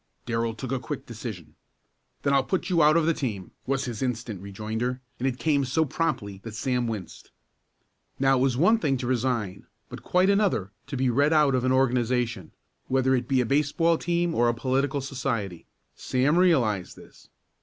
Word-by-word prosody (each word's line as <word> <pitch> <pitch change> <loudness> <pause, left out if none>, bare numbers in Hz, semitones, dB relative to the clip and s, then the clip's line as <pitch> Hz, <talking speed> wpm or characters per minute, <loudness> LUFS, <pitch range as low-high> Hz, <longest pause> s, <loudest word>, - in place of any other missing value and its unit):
Darrell 115 -1 -1
took 130 +2 -6
a 135 - 0
quick 130 +3 -6
decision. 110 - -8 0.7
"Then 140 - +2
I'll 135 -1 +4
put 185 +5 -2
you 170 -2 +4
out 155 +2 +6
of 165 - +2
the 165 - +3
team!" 110 - -4 0.2
was 135 +1 0
his 120 -4 -5
instant 120 -6 -3
rejoinder, 110 +5 -3 0.2
and 130 - 0
it 125 -2 -2
came 145 -1 +1
so 150 +5 +1
promptly 125 -11 -2
that 115 -2 -7
Sam 125 +1 -1
winced. 110 -5 -7 0.9
Now 135 -1 +3
it - - +4
is 125 -2 -1
one 215 - +4
thing 135 -9 +1
to 125 - -4
resign, 120 -6 -1 0.2
but - - -8
quite 185 +2 +3
another 200 - +1 0.2
to 140 - -4
be 130 -1 +2
read 145 +6 +3
out 150 -3 +4
of 130 -1 +1
an 130 - +2
organization, 120 -6 +1 0.4
whether 130 0 +2
it 125 -2 0
be 130 -2 +2
a - - 0
baseball 150 +5 +2
team 170 -1 0
or 120 -5 +3
a 120 - 0
political 135 +3 0
society. 120 - -3 0.3
Sam 130 +5 +1
realized 120 - +2
this. - - -17
130 Hz, 185 wpm, -26 LUFS, 115-145 Hz, 0.9 s, out